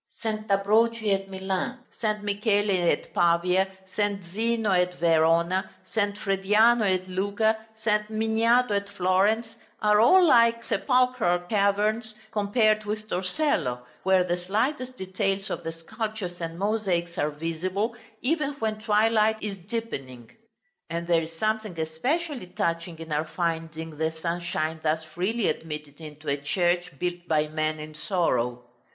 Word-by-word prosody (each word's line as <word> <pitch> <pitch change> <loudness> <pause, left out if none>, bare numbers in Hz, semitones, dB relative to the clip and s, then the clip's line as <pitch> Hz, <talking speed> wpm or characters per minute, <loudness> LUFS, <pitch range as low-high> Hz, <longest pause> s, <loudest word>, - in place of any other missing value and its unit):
St. 215 -1 -3
Ambrogio 215 +2 +3
at 195 0 -2
Milan, 190 +5 -2 0.2
St. 215 -2 -1
Michele 205 -3 +1
at - - -1
Pavia, 175 +2 +3 0.3
St. 205 -2 0
Zeno 225 0 0
at 180 -1 +2
Verona, 170 +3 +2 0.2
St. 205 -3 -1
Frediano 210 +4 +3
at 185 0 -1
Lucca, 205 +4 +1 0.2
St. 210 -1 0
Miniato 225 +2 +2
at 200 0 -2
Florence, 200 +4 +1 0.2
are 210 0 +4
all 365 +10 +7
like 230 -5 +5
sepulchral 250 -10 +2
caverns 210 +2 +1 0.2
compared 215 0 +2
with 215 0 -4
Torcello, 180 - 0 0.2
where 190 -1 +4
the 175 0 -1
slightest 250 +8 -1
details 195 +1 -2
of - - -4
the 165 - -3
sculptures 195 +1 -5
and 165 0 -4
mosaics 190 -4 -1
are 150 - +1
visible, 180 +9 -2 0.3
even 295 +1 0
when 220 -5 -3
twilight 220 0 +3
is 210 -2 -4
deepening. 135 - -5 0.6
And 170 0 -3
there 170 -1 +3
is 165 0 -7
something 215 -3 -1
especially 250 - -2
touching 170 -1 -2
in 165 0 -9
our 150 +1 0
finding 165 -2 -3
the 160 0 +2
sunshine 160 -1 -2
thus 160 0 0
freely 190 +8 -1
admitted 150 -1 -5
into 155 0 -10
a 140 0 +1
church 175 +4 0
built 175 +2 -3
by 155 -1 +1
men 155 0 -1
in 155 0 -8
sorrow. 135 - 0
195 Hz, 135 wpm, -26 LUFS, 170-220 Hz, 0.6 s, all